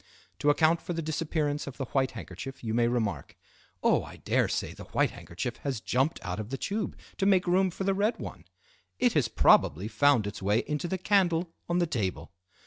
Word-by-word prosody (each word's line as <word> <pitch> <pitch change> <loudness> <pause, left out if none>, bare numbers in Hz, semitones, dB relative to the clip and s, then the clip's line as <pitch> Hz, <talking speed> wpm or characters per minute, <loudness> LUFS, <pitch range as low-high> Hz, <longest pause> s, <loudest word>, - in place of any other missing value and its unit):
To 145 - +2
account 160 +2 +4
for 175 - -4
the 165 - -2
disappearance 150 -2 -1
of 135 - -7
the 135 - -3
white 135 0 +1
handkerchief 95 - -8
you 110 -1 -2
may 120 0 +3
remark: 110 - -2 0.5
"Oh, - - +4
I - - -10
dare - - +1
say - - -2
the - - -10
white - - +1
handkerchief 95 +9 -5
has 135 -5 -3
jumped 130 +8 0
out 90 +1 -3
of 110 0 -5
the 135 - -3
tube 205 +8 -3 0.2
to 195 - +1
make 190 -2 +4
room 185 +1 +3
for 180 - -5
the 195 0 +2
red 205 +4 +1
one. - - -8 0.5
It 245 -2 +3
has 140 -6 +2
probably 90 -3 +4
found 140 -2 +3
its 100 0 -5
way 105 +4 +2
into 150 +3 -2
the 190 - -1
candle 180 -3 +2 0.2
on 175 - +2
the 175 - +3
table." 100 - -3
145 Hz, 210 wpm, -29 LUFS, 115-175 Hz, 0.5 s, account